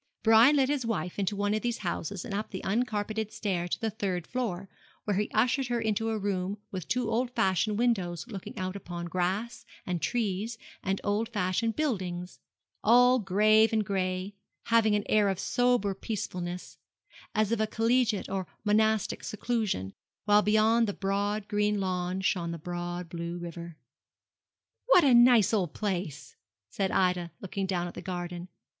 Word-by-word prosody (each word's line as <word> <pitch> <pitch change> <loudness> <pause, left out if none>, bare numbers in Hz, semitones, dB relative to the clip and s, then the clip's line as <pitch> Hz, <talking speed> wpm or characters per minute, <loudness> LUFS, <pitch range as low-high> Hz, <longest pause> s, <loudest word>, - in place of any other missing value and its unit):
Brian 225 +6 +7
led 270 -2 +3
his 285 -2 0
wife 210 -5 -3
into 200 +1 0
one 205 +1 0
of 215 - 0
these 240 -1 -1
houses 180 +2 -3
and 230 - -6
up 210 +2 -3
the 190 - -6
uncarpeted 215 -1 -1
stair 195 -5 -2
to - - -2
the 225 -1 -1
third 190 -5 -2
floor, 200 -6 -3 0.4
where 205 - -1
he 210 - 0
ushered 250 +4 +2
her 240 -1 0
into 220 0 0
a 220 - -1
room 195 -1 -2
with 185 -4 -5
two 245 +2 0
old 240 +2 +1
fashioned 210 0 +1
windows 190 -8 0
looking 200 -6 -8
out 185 0 -3
upon 175 -3 -6
grass, 190 +7 -2 0.2
and 175 -3 -2
trees, 225 -1 -1 0.2
and 195 0 -1
old 210 +2 0
fashioned 210 +1 0
buildings, 185 -11 -2 0.4
all 245 +3 +6
grave 215 +3 +4
and 220 -2 +1
gray, 185 -2 -1
and 195 - -8 0.4
having 225 -2 +4
an 205 - 0
air 210 -2 +3
of 190 - -1
sober 245 -5 +1
peacefulness, 180 -3 -5 0.6
as 215 0 +2
of 230 -2 +1
a 220 - +1
collegiate 225 -1 +1
or 190 -1 -3 0.2
monastic 215 0 +1
seclusion, 215 - -2 0.3
while 210 0 +5
beyond 220 +2 +3
the 205 - -2
broad 200 +2 -1
green 210 0 +1
lawn 185 0 -2
shone 175 -3 0
the 170 - -4
broad 175 +1 -5
blue 170 +1 -5
river. 170 -1 -8 1.1
'What - - +7
a 270 -3 +5
nice 240 -3 +6
old 185 -7 0
place!' 180 -8 -3 0.4
said 195 -1 -1
Ida, 180 -2 +1
looking 195 0 -3
down 180 -2 -1
at 175 - -8
the - - -7
garden. 175 -1 -5
205 Hz, 170 wpm, -29 LUFS, 185-225 Hz, 1.1 s, Brian